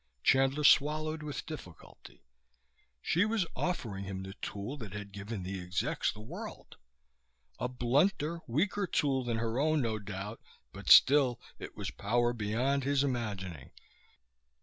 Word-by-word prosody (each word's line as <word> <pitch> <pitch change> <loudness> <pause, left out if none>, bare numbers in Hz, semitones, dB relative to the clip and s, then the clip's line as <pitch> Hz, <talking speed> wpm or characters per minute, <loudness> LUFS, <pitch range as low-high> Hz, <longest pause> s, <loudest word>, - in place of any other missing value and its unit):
Chandler 135 +2 +3
swallowed 155 +2 +4
with 150 -1 -5
difficulty. 120 - -11 0.8
She 175 - +3
was 215 -3 +1
offering 120 - -2
him 95 -1 -5
the 95 0 -7
tool 105 +7 -4
that 110 -7 -8
had 105 -1 -6
given 100 0 -6
the 95 0 -4
execs 90 +1 -1
the 105 - -11
world. 110 - -9 0.8
A - - 0
blunter, 145 +7 +1
weaker 195 - 0
tool 135 -5 +1
than 120 -2 -1
her 115 +2 -1
own, 155 +1 +3
no 110 -2 -1
doubt. 100 +2 -6 0.3
But - - -6
still 135 -4 +7 0.2
it - - -9
was - - -4
power 120 +3 +1
beyond 120 +6 0
his 140 0 +2
imagining. 100 - -3
120 Hz, 140 wpm, -32 LUFS, 105-145 Hz, 0.8 s, still